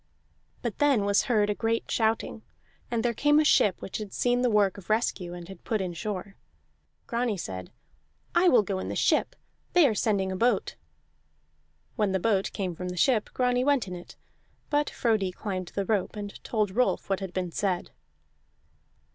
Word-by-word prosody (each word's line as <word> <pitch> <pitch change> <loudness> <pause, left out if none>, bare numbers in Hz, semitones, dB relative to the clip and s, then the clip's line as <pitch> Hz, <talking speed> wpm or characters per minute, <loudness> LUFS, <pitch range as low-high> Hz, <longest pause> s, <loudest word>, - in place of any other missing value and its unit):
But - - -3
then 280 -8 +3
was 200 0 +3
heard 215 -5 +2
a - - +1
great 225 +2 -1
shouting, 220 0 0 0.5
and 235 -1 -1
there 240 - +2
came 295 +6 +4
a 310 - +3
ship 205 -9 +4
which - - -4
had 210 -3 -7
seen 245 0 +1
the 250 - +3
work 205 -3 +2
of 185 - -16
rescue, 200 -5 0
and 175 -1 -9
had 190 -2 -12
put 220 - -1
in 185 -2 -3
shore. 195 +2 -5 0.7
Grani 235 -3 -1
said: 95 - -6 0.6
"I 355 +1 +5
will 240 -7 +5
go 195 -1 -2
in - - -4
the - - -3
ship; - - +2 0.4
they 350 -5 +6
are 230 - +1
sending 200 -3 0
a - - -2
boat." 240 +6 +1 1.2
When 210 -4 +1
the 190 - +1
boat 200 -1 +1
came 185 -4 -3
from 180 +2 -5
the 180 - -6
ship, 220 +3 +2
Grani 250 0 +2
went 280 -6 +2
in 185 - -6
it; 175 - -11 0.6
but 295 0 +2
Frodi 215 -6 0
climbed 185 -1 -4
the 200 - 0
rope 205 0 0
and 205 -1 -7
told 215 -4 0
Rolf 250 +1 +1
what 195 -1 0
had 190 -2 -5
been 180 -1 -3
said. 185 -1 -1
210 Hz, 190 wpm, -27 LUFS, 190-240 Hz, 1.2 s, they